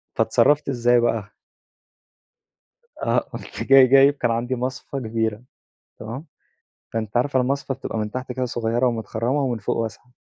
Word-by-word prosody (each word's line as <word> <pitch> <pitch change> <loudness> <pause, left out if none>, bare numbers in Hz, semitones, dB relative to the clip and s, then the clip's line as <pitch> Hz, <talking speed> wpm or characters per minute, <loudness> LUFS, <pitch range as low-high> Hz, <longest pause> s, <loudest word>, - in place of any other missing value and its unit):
فاتصرّفت 145 0 +3
إزاي 120 -1 +3
بقى؟ 115 -3 -1 1.7
آه - - +1
قُمت - - -7
جاي 135 -1 +7
جايب 135 +2 +6
كان 120 -4 -1
عندي 120 +3 -1
مصفى 130 +2 -4
كبيرة، 110 -1 -2 0.6
تمام؟ 120 +9 -7 0.7
فأنتِ 110 -1 -3
عارفة 130 +2 +2
المصفى 135 +1 -1
بتبقى 115 - -5
من 105 -1 -2
تحت 130 +1 -5
كده 130 +1 -2
صغيّرة 120 +1 0
ومتخرّمة 120 +3 -1
ومن 125 -4 -1
فوق 105 - -2
واسعة. 115 +2 -5
120 Hz, 140 wpm, -22 LUFS, 115-130 Hz, 1.7 s, جاي